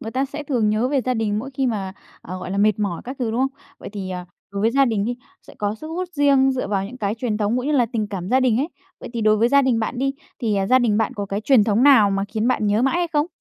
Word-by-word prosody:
người 225 - -6
ta 265 +3 0
sẽ 290 +2 -6
thường 245 -7 0
nhớ 220 +4 +1
về 275 -1 +1
gia 255 0 -1
đình 215 -2 -1
mỗi 265 +5 -6
khi 265 0 0
mà, 195 -5 -2 0.3
ờ, 185 +2 -7
gọi 185 0 -7
là, 200 - -2
mệt 210 0 +3
mỏi 200 -5 -2
các 260 +2 -6
thứ, 240 -3 -1
đúng 235 +3 -1
không? 270 +1 -2 0.2
Vậy - - -8
thì, 190 -2 -5
ờ, 180 -1 -5 0.3
đối 200 - -3
với 225 - +3
gia 275 +3 +4
đình 220 -5 0
đi, 240 +2 -2 0.3
sẽ - - -14
có 205 0 -1
sức 310 - -10
hút 355 +2 -4
riêng 280 -3 +4
dựa 255 -6 -3
vào 195 -2 0
những 230 +6 -8
cái 205 -2 -1
truyền 225 -2 -2
thống 210 +2 0
cũng 250 +2 -2
như 300 - +1
là 255 -5 +3
tình 215 -2 -1
cảm 185 -2 -5
gia 260 +2 +3
đình 250 -4 +2
ấy, 290 - 0 0.3
vậy - - -8
thì 235 - -3
đối 215 0 +4
với 230 +3 +3
gia 280 +2 +5
đình 255 -4 +2
bạn 225 +3 -3
đi, 270 +1 0 0.3
thì, 220 -3 0
à, 195 - 0
gia 255 +5 +5
đình 220 -4 +2
bạn 225 +3 0
có 205 -3 -4
cái 200 +2 -3
truyền 240 -2 +4
thống 215 +2 +2
nào 255 -8 +6
mà 195 0 0
khiến 220 +3 -1
bạn 235 -4 +1
nhớ 205 +3 +2
mãi 270 +5 +2
hay 345 -1 0
không? 295 0 +2
230 Hz, 320 wpm, -22 LUFS, 205-265 Hz, 0.3 s, nào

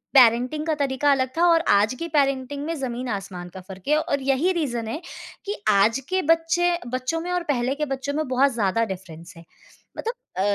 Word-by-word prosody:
Parenting 250 +4 +5
का 315 - +1
तरीका 280 0 +1
अलग 260 -2 +2
था 345 - +4
और 330 -1 +5
आज 205 +4 +4
की 335 - -3
पैरेंटिंग 275 0 0
में 330 +1 -2
ज़मीन 250 -2 -4
आसमान 190 -3 -5
का 190 - -7
फ़र्क 190 +3 -10
है 300 - +5
और 280 -3 -1
यही 275 +7 +2
रीज़न 240 -10 -2
है 300 +9 -4 0.4
कि 410 - -2
आज 215 +5 +4
के 375 0 +1
बच्चे 330 +2 +2
बच्चों 255 +6 -2
में 355 +1 -4
और 355 -1 0
पहले 250 +1 -1
के 300 +1 -1
बच्चों 270 +1 -3
में 310 -1 -1
बहुत 260 +2 +3
ज़्यादा 230 0 +1
डिफरेंस 170 -2 -12
है। 165 - -12 0.5
मतलब 460 - -2 0.2
अ, - - +1
270 Hz, 205 wpm, -24 LUFS, 230-310 Hz, 0.5 s, पैरेंटिंग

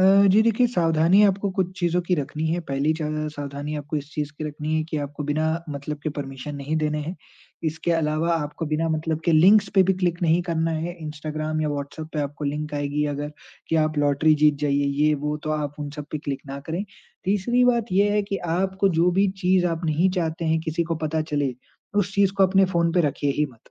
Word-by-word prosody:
अ, 185 - +5 0.3
जी, 215 - +6
देखिए 230 +2 +3
सावधानियाँ 175 0 +4
आपको 195 +1 -2
कुछ 185 -1 0
चीज़ों 175 0 +2
की 180 +1 +1
रखनी 155 +1 -3
हैं, 170 +2 0
पहली 140 +3 +1
ज़्या 155 0 -2
सावधानी 145 0 -5
आपको 145 +1 -4
इस 145 +1 -5
चीज़ 150 -1 -3
की 155 - -4
रखनी 150 +1 -3
है 155 - +1
कि 155 - -2
आपको 145 +1 -6
बिना 155 +2 +1 0.2
मतलब 145 +1 -5
के 155 - -1
परमिशन 135 +1 -6
नहीं 140 +3 -2
देने 150 -1 0
है, 160 +5 -4 0.5
इसके 160 +2 -1
अलावा 160 +1 +1
आपको 150 +1 -3
बिना 155 +2 0
मतलब 160 0 -1
के 170 - +3
लिंक्स 190 +7 +6
पे 190 - +7
भी 190 +1 +3
क्लिक 175 0 0
नहीं 165 +1 +3
करना 165 -2 -1
है, 165 +2 -3
इंस्टाग्राम 155 +1 -3
या 150 - 0
व्हाट्सऐप 145 +2 -5
पे 150 - 0
आपको 145 +1 -4
लिंक 150 +1 -3
आएगी 145 +1 -1
अगर 145 +1 -5 0.4
कि 165 - +2
आप 155 -1 -1
लॉटरी 145 +2 +3
जीत 150 0 +4
जाइए, 140 0 +2 0.2
ये 155 - +4
वो, 150 +1 -2
तो 155 0 -5
आप 150 -2 -2
उन 145 - -4
सब 150 -1 -6
पे 155 - -3
क्लिक 140 -1 -4
ना 135 +1 -6
करें, 175 +6 -2 0.4
तीसरी 210 +6 +2
बात 235 -4 +2
ये 200 +2 +4
है 210 0 +2
कि - - +2 0.2
आपको 190 +1 +1
जो 180 +1 +4
भी 200 - +4
चीज़ 180 0 +3
आप 165 0 -2
नहीं 165 +4 +2
चाहते 165 0 -2
हैं 160 0 +2
किसी 160 +1 -1
को - - +2
पता 160 +1 0
चले, 140 -3 0 0.4
उस 200 -1 0
चीज़ 200 -1 +3
को 195 - +4
अपने 195 +1 +4
फ़ोन 170 -1 +2
पे 180 - +3
रखिए 140 +1 -1
ही 150 0 +2
मत, 115 - -23
155 Hz, 230 wpm, -24 LUFS, 150-175 Hz, 0.5 s, पे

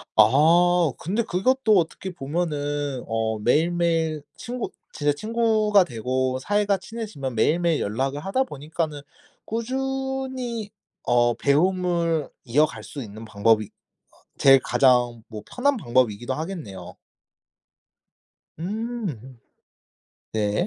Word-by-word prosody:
아 160 +8 +5
근데 205 +8 -1
그것도 220 +3 +2
어떻게 180 +2 -2
보면은 145 -4 -2
어 110 -1 -1
매일매일 165 +3 +1
친구 245 +1 -5 0.2
진짜 145 -1 0
친구가 215 +1 +2
되고 130 0 -2
사이가 205 +4 +1
친해지면 185 - -6
매일매일 165 +7 +2
연락을 135 +7 -2
하다 195 - 0
보니까는 155 - -4 0.4
꾸준히 260 -1 -3 0.3
어 120 -1 +3
배움을 170 +1 +1
이어갈 150 +6 +1
수 140 - -7
있는 110 0 -9
방법이 110 0 +2 0.4
어 - - -26 0.2
제일 135 -1 +7
가장 120 -3 +2
뭐 110 -2 -7
편한 275 +1 +1
방법이기도 120 - 0
하겠네요. 150 - -6 1.6
음. 180 - -5 0.9
네. 105 -1 0
155 Hz, 235 characters per minute, -24 LUFS, 130-205 Hz, 1.6 s, 제일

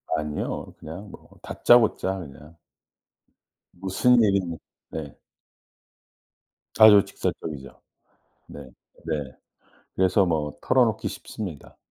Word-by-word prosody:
아니요. 75 -1 -4
그냥 90 +6 -9
뭐 - - -15
다짜고짜 110 -5 +3
그냥 75 +1 -12 1.2
"무슨 95 +7 +1
일이니?" 95 -5 0 0.3
네. 75 -3 -7 1.6
아주 105 -2 +9
직설적이죠. 70 -8 -6 0.7
네 75 - -10 0.5
네. 80 - -1 0.8
그래서 95 +1 +3
뭐 75 -3 -2
털어놓기 120 -4 +1
쉽습니다. 95 -9 -8
90 Hz, 195 characters per minute, -24 LUFS, 75-100 Hz, 1.6 s, 아주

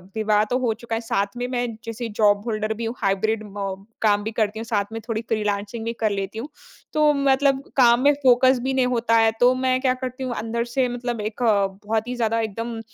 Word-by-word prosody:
विवाह 215 -1 +2
तो 250 - +3
हो 235 -3 +1
चुका 230 -1 -3
है। 225 - -2
साथ 200 -3 0
में, 245 0 -2
मैं 245 -1 -1 0.2
जैसे 230 +1 -5
जॉब 205 -1 +4
होल्डर 215 0 -1
भी 230 +1 -5
हूँ, 230 +2 -3
हाइब्रिड 215 +3 0
म 195 0 -4 0.2
काम 205 -1 +3
भी 220 - -3
करती 220 -1 -1
हूँ, 230 - -5
साथ 205 -3 0
में 225 - -3
थोड़ी 225 -1 -2
फ्रीलांसिंग 210 +1 -2
भी 230 - -2
कर 215 - +3
लेती 200 +2 -3
हूँ। 275 +6 -6 0.4
तो 305 -1 +4
मतलब 275 0 +2
काम 240 -1 +6
में 290 +1 +6
फ़ोकस 255 0 +5
भी 265 0 0
नहीं 255 -1 +3
होता 235 -2 +1
है। 225 0 +4
तो 250 +1 +6
मैं 255 0 +2
क्या 255 -2 +2
करती 255 +1 -4
हूँ, 250 -2 -2
अंदर 230 +1 -2
से, 260 -2 +3
मतलब 240 -2 -3
एक 215 +3 -5 0.4
बहुत 220 +2 -1
ही 250 - -3
ज़्यादा 230 -1 0
एकदम, 225 +2 -4
230 Hz, 225 wpm, -23 LUFS, 215-250 Hz, 0.4 s, काम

